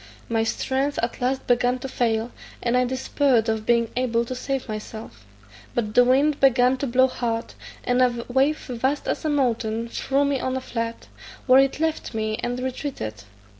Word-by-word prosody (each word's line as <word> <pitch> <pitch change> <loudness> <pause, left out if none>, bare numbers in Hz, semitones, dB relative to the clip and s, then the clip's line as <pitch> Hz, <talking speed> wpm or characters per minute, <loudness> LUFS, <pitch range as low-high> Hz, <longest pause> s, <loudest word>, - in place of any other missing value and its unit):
My 225 -1 +1
strength 270 +5 -1
at 235 - -2
last 260 +2 0
began 245 +1 +2
to 260 +2 -6
fail, 230 -2 0 0.3
and 240 0 +1
I 250 0 +3
despaired 260 -1 +1
of 220 -1 -1
being 235 -1 +2
able 235 -2 +1
to 255 - -5
save 265 +1 -3
myself, 215 - -8 0.5
but 215 -3 -1
the 245 - +7
wind 275 +4 +3
began 255 -1 +4
to 275 - -2
blow 260 +2 +4
hard, 235 -3 -3 0.3
and 250 +1 +2
a 240 -2 +1
wave 270 +5 +2
vast 260 +3 -2
as - - -2
a - - +2
mountain 235 -5 0
threw 275 +4 0
me 280 -1 0
on 260 +1 -1
a - - -1
flat, 230 -2 -4 0.4
where 260 0 +7
it 270 +1 +2
left 320 -6 -2
me, 215 0 -1
and 245 +1 -2
retreated. 250 - -5
250 Hz, 180 wpm, -24 LUFS, 230-265 Hz, 0.5 s, the